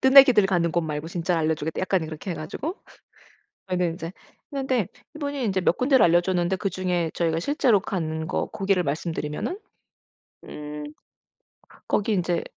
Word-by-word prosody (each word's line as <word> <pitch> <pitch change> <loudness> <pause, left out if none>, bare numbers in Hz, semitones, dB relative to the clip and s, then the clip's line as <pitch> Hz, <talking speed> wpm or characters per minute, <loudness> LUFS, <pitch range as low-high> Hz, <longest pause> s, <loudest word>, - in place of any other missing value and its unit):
뜨내기들 265 -5 +8
가는 175 -3 +1
곳 175 - +2
말고 155 -1 -3
진짜 170 +1 -1
알려 160 0 +2
주겠다." 155 +1 -4
약간 185 -1 +1
이렇게 160 +4 -6
해 - - -4
가지고 165 - -4 0.9
저희는 180 -2 0
이제 165 0 -6 0.4
했는데 260 -7 0 0.3
이분이 285 -4 -2
이제 190 -2 +1
몇 175 - +2
군데를 260 -2 +5
알려 175 0 +5
줬는데 180 0 0
그중에 180 -4 -1
저희가 165 -1 +1
실제로 245 - +3
간 160 -5 -3
거 - - -1
고기를 195 -3 +1
말씀드리면은 155 - -3 0.9
음 150 0 -7 1.0
거기 215 +2 +1
인제 175 -3 0
180 Hz, 345 characters per minute, -25 LUFS, 160-210 Hz, 1.0 s, 뜨내기들